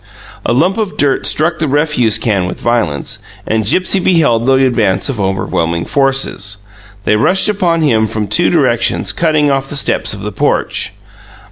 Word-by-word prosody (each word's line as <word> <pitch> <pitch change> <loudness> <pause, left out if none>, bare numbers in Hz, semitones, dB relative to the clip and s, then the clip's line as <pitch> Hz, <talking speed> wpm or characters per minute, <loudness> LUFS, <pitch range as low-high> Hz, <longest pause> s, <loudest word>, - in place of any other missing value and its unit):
A - - +1
lump 175 - +1
of 210 -3 -3
dirt 140 -2 +1
struck 155 - +1
the 155 - -1
refuse 145 -6 +2
can 100 -6 -1
with 90 - -6
violence, 110 -13 -1 0.3
and 110 -2 -1
Gipsy 185 - +2
beheld 150 -11 +1
the 135 0 +3
advance 115 -3 0
of 120 -7 -3
overwhelming 90 -3 -2
forces. 135 -8 0 0.5
They 105 - +2
rushed 185 - +3
upon 180 -6 0
him 110 -7 +2
from 105 -1 -3
two - - +3
directions, - - +1
cutting 155 -3 +1
off 135 0 -2
the - - -4
steps 140 - +1
of 100 - -10
the 105 - -4
porch. - - -1
130 Hz, 165 wpm, -13 LUFS, 105-155 Hz, 0.5 s, the